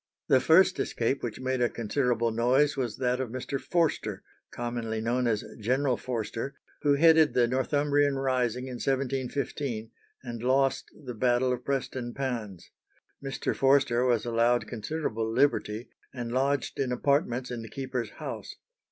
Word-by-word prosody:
The 130 - +6
first 165 +7 +5
escape 120 +4 -1
which 115 -3 -4
made 130 -1 -1
a 120 - +3
considerable 120 0 0
noise 125 +6 +3
was 125 -5 -2
that 125 -1 0
of 130 -3 -2
Mr. 130 +3 -4
Forster, 170 -3 0 0.3
commonly 120 -2 -3
known 120 +2 0
as 110 -2 0 0.2
General 130 +4 +1
Forster, 120 +2 -4 0.3
who 145 -1 +3
headed 160 0 +5
the 120 -1 +4
Northumbrian 145 +2 +1
rising 125 -2 0
in 125 -2 -6
1715, 135 -3 -2 0.3
and 120 -3 -6
lost 135 +2 +1 0.2
the 125 - -5
battle 125 +2 +2
of 125 0 -5
Preston 130 -3 -3
Pans. 115 -9 -4 0.5
Mr. 135 -1 -2
Forster 135 -3 +3
was 120 -3 +2
allowed 120 +1 +2
considerable 115 -2 -3
liberty, 120 -3 +1 0.2
and 120 -2 -5
lodged 135 +2 0
in 130 -2 0
apartments 130 -1 0
in 120 -2 -4
the 115 - -9
keeper's 130 -4 -4
house. - - -7
125 Hz, 145 wpm, -28 LUFS, 120-135 Hz, 0.5 s, The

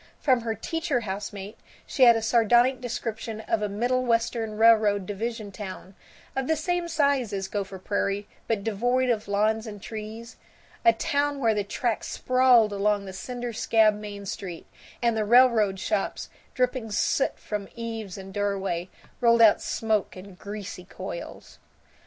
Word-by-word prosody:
From 255 -4 +3
her 225 -1 -2
teacher 315 +3 -2
housemate 200 0 -6 0.3
she - - -5
had 235 -1 +8
a 225 - -1
sardonic 240 +3 +3
description 230 -2 -4
of 220 0 -1
a 210 - -1
Middlewestern 230 0 0
railroad 215 -3 +5
division 215 +1 -4
town, 190 -1 -8 0.4
of 265 -1 -1
the 320 - +2
same 350 +3 -1
size 280 -8 +1
as 195 -1 -3
Gopher 195 -1 -4
Prairie 200 +1 -2 0.2
but 220 -3 -1
devoid 245 +4 +1
of 215 -3 -2
lawns 215 +2 +1
and 205 -1 -7
trees, 220 +2 -8 0.5
a 345 - +7
town 290 -4 0
where 230 -4 +3
the 205 -1 0
tracks 225 +3 -2
sprawled 255 -4 +4
along 205 0 +1
the 190 - -8
cinder 245 +4 -5
scabbed 215 -1 +3
Main 205 -1 -8
Street, 180 -3 -6 0.4
and 235 -1 +3
the 220 - +1
railroad 220 -4 +4
shops, 210 -1 -2 0.3
dripping 250 -2 0
soot 240 +6 +1
from 210 -2 -5
eaves 225 -5 -5
and 195 0 -9
doorway, 195 -4 -2 0.3
rolled 235 -1 +4
out 215 - +6
smoke 215 -4 -1
in 190 +1 -10
greasy 200 0 -7
coils. 200 - -8
220 Hz, 150 wpm, -26 LUFS, 205-240 Hz, 0.5 s, had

